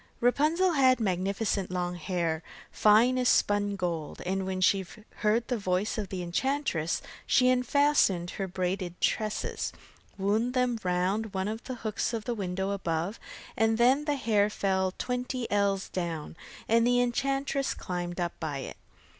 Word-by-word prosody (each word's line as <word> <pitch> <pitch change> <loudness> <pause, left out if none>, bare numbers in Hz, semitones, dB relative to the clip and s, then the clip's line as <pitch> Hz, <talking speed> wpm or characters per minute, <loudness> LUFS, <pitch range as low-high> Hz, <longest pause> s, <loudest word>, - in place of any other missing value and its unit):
Rapunzel 310 +9 +3
had 260 -5 +4
magnificent 195 0 -1
long 180 -1 -2
hair, 170 -2 -2 0.3
fine 230 +5 +4
as 250 - +3
spun 205 0 +2
gold, 170 -5 -3
and 190 +1 -1
when 190 -1 -2
she 190 +1 +3 0.3
heard 225 +2 +1
the 245 -3 -1
voice 185 +2 0
of 210 -4 -3
the 185 -2 -4
enchantress 175 - -1 0.2
she 255 -1 +4
unfastened 250 -8 +3
her 195 - -3
braided 180 -1 -3
tresses, 215 -1 -1 0.5
wound 215 +6 0
them 250 -2 +1
round 190 +4 0
one 190 +1 -1
of 220 +2 -4
the 255 - -4
hooks 220 -1 -2
of 220 - -5
the 245 - -1
window 190 -2 -2
above, 175 0 -2 0.4
and 225 0 +2
then 260 +5 +4
the 295 -1 +1
hair 210 -6 +2
fell 190 -2 0
twenty 250 0 -2
ells 200 -1 +1
down, 165 -4 -4 0.3
and 230 +1 +4
the 245 0 +3
enchantress 275 +2 0
climbed 175 0 -4
up 175 -1 -1
by 155 -4 -3
it. 135 - -7
205 Hz, 155 wpm, -29 LUFS, 180-245 Hz, 0.5 s, had